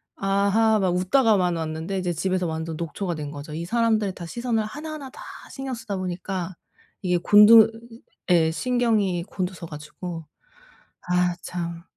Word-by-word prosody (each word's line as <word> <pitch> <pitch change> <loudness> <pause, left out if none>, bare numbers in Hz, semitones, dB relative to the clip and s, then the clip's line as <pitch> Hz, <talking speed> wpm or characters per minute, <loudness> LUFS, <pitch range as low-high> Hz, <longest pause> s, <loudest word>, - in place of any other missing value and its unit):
아하 200 +3 +2
막 185 -2 +1
웃다가만 185 -2 +3
왔는데 160 +4 -3
이제 180 -2 -1
집에서 185 +1 -1
완전 160 0 -4
녹초가 170 +2 -3
된 145 -1 -5
거죠. 145 +1 -8
이 165 +2 -4
사람들의 220 -2 +1
다 175 - -7
시선을 235 +4 -1
하나하나 300 +3 -7
다 - - -13 0.3
신경 270 -1 -5
쓰다 225 -4 -5
보니까 185 0 -4 0.5
이게 180 -2 +1
곤두 210 +4 +7 0.6
예 160 -2 +4
신경이 215 -4 +1
곤두서 185 -2 -5
가지고, 160 +2 -8 0.8
아 180 0 +2
참. 170 -1 -5
185 Hz, 300 characters per minute, -24 LUFS, 170-220 Hz, 0.8 s, 곤두